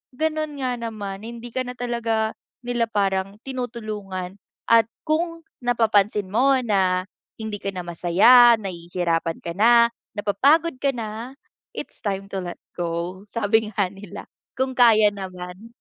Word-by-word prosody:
ganun 310 0 -1
nga 250 -1 -1
naman 210 -4 -5
hindi 235 +1 -8
ka 255 +2 -2
na 250 - -6
talaga 230 -3 -1 0.3
nila 240 -1 0
parang 195 -2 0
tinutulungan 215 -7 -5 0.3
at 230 -1 +6 0.2
kung 330 +1 -1 0.2
napapansin 210 -4 +2
mo 270 +6 +4
na 190 -4 +2 0.3
hindi 220 -2 -5
ka 200 - -3
na 180 - -4
masaya, 205 +9 +6
nahihirapan 170 -4 -2
ka 170 - -4
na, 235 +4 +5 0.3
napapagod 270 +9 +2
ka 280 - +1
na, 230 +3 -6 0.4
it's - - -7
time 195 -3 -2
to 195 - -2
let 175 -1 -6 0.2
go 175 +2 -3
sabi 220 +1 +1
nga 195 -3 0
nila 195 -1 -10 0.3
kung 260 0 0
kaya 220 -4 +6
naman. 185 0 -8
215 Hz, 135 wpm, -23 LUFS, 190-240 Hz, 0.4 s, at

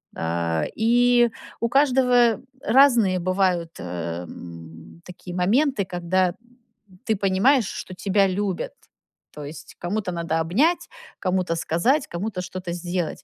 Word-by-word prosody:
А, 80 -1 -1
и 240 +1 +4 0.3
у 235 - 0
каждого 250 -4 +3 0.2
разные 230 -6 +4
бывают, 180 -2 0
э, 85 -1 -5
м, 80 -1 -11
такие 180 0 -9
моменты, 220 +5 +2
когда 180 0 0 0.7
ты 220 - +1
понимаешь, 200 +5 +3
что 185 - -7
тебя 195 +1 +2
любят. 190 -1 -2 0.6
То 150 -1 -8
есть, 145 +1 -10
кому-то 190 +1 -3
надо 165 -1 -1
обнять, 250 - +1 0.3
кому-то 185 -2 0
сказать, 235 - +1
кому-то 185 +2 -4
что-то 185 -1 -6
сделать. 175 -1 -3
185 Hz, 120 wpm, -23 LUFS, 165-225 Hz, 0.7 s, и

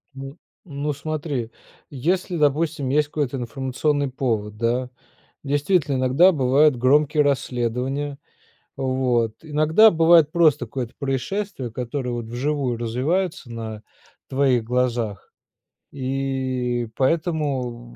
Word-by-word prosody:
Н, 135 +3 -8 0.3
ну 145 -2 -3
смотри, 145 -5 -4 0.4
если 175 +6 -1
допустим 150 -1 +1
есть 150 +2 +2
какой-то 145 -3 -2
информационный 135 +3 -1
повод, 110 -6 -2
да. 120 +3 0 0.5
Действительно 145 +1 +1
иногда 130 +9 +5
бывают 140 +1 +4
громкие 145 +4 +3
расследования, 135 +1 -1 0.6
вот, 130 -4 0
иногда 155 +7 +5
бывает 165 -2 +5
просто 155 -7 +3
какое-то 120 0 -5
происшествие, 140 - -3
которое 125 +2 -4
вот 120 -1 -4
вживую 125 +1 -2
развиваются 135 +7 -1
на 110 -2 -6 0.5
твоих 130 -3 +2
глазах 120 -4 -2 0.6
и 130 -3 -2
поэтому 135 -6 -1
135 Hz, 100 wpm, -23 LUFS, 125-150 Hz, 0.6 s, иногда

